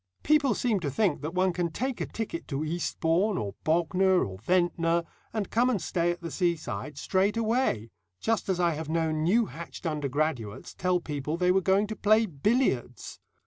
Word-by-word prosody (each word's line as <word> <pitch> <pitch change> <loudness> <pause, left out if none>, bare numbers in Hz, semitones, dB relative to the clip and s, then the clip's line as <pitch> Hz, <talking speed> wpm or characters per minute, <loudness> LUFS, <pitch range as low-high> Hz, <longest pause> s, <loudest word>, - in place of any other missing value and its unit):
People 290 -6 +3
seem 225 -5 +1
to 155 -5 -2
think 165 0 +1
that 155 +4 -5
one 185 0 +2
can 175 -1 -1
take 255 +8 -3
a - - -2
ticket 215 -7 -5
to 140 0 -2
Eastbourne, 175 +4 0
or 100 - -3
Bognor, 180 +3 +3
or 95 -2 -8
Ventnor, 170 - +1 0.3
and 215 -4 -3
come 240 +3 +3
and 230 -6 +1
stay 170 0 0
at 175 0 -2
the 170 - -5
seaside 170 -4 -2
straight 195 +8 +1
away, 225 - 0 0.3
just 225 -3 -1
as 185 -2 +1
I 175 -1 +3
have 155 0 -5
known 160 -1 0
new 215 +9 +3
hatched 170 -2 -9
undergraduates 145 -7 -2
tell 180 0 +1
people 150 0 -3
they 180 0 +3
were 190 +1 +3
going 195 +3 +3
to 215 +1 -5
play 215 +2 +4
billiards. 150 - -1
175 Hz, 185 wpm, -28 LUFS, 155-205 Hz, 0.3 s, play